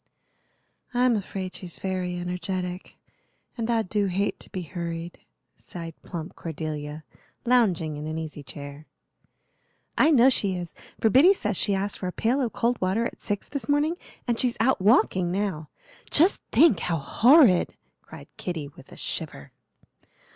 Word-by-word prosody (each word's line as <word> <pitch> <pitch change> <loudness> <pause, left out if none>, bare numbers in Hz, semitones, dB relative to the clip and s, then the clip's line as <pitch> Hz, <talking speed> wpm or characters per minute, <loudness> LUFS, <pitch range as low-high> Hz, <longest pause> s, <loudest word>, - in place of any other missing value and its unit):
"I'm 250 -1 +4
afraid 190 -2 -4
she's 175 -3 -5
very 185 -2 -2
energetic, 180 +1 -4 0.6
and 230 -1 -3
I 230 -1 +2
do 205 +1 0
hate 195 +2 -1
to - - -8
be 185 - -5
hurried," 170 0 -5 0.4
sighed 165 -2 -9
plump 170 -3 -7
Cordelia, 155 -1 -5 0.4
lounging 185 -11 +2
in 150 +1 -5
an 155 +1 -3
easy 155 -2 -6
chair. 145 +2 -9 1.1
"I 305 - +6
know 265 -3 +6
she 200 -6 +1
is, 175 -2 -6 0.3
for 220 - +3
Biddy 340 - +7
says 210 - -2
she 200 +2 +1
asked 195 +1 -2
for 185 - -3
a - - -2
pail 245 +9 +1
of 240 -4 -1
cold 240 +1 0
water 190 +5 +1
at - - -6
six 205 -2 -3
this 280 0 -5
morning, 295 +3 +2 0.3
and 235 -1 0
she's 245 -2 0
out 230 -2 +2
walking 190 -4 +3
now. 185 -6 -2 0.4
Just 340 +6 +4
think 320 - +5
how 170 -2 0
horrid," 225 - +5 0.3
cried - - -12
Kitty 160 -6 -4
with 135 -2 -17
a - - -12
shiver. - - -5
185 Hz, 155 wpm, -26 LUFS, 165-235 Hz, 1.1 s, Biddy